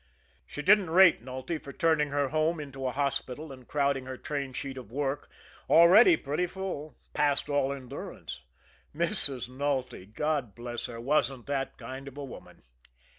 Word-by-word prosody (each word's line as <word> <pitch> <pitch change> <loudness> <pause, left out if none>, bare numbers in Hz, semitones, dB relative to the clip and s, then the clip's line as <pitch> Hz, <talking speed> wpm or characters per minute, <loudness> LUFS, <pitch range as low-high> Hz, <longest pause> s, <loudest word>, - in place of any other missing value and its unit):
She 150 - -6
didn't 195 -1 +5
rate 180 -5 +6
Nulty 130 +6 -4
for 140 - -9
turning 160 -2 +2
her 140 -1 0
home 155 +2 +1
into 135 -3 -5
a - - 0
hospital, 140 +1 -2
and 130 -2 -12
crowding 140 -3 0
her 130 0 -5
train 140 -2 -3
sheet 135 +1 -5
of 125 -5 -9
work, 140 +2 -2 0.4
already 170 +2 +8
pretty 150 +6 -1
full, 180 -5 -6 0.2
past 145 -1 +1
all 145 -1 +2
endurance 130 - -7 0.5
Mrs. 145 -6 -1
Nulty, 130 -6 -2
God 135 0 -2
bless 120 0 -5
her, 115 -1 -8
wasn't 130 -1 0
that 140 -1 -2
kind 130 +3 -8
of 140 0 -10
a 145 - -5
woman! 135 - -12
140 Hz, 160 wpm, -29 LUFS, 130-155 Hz, 0.5 s, already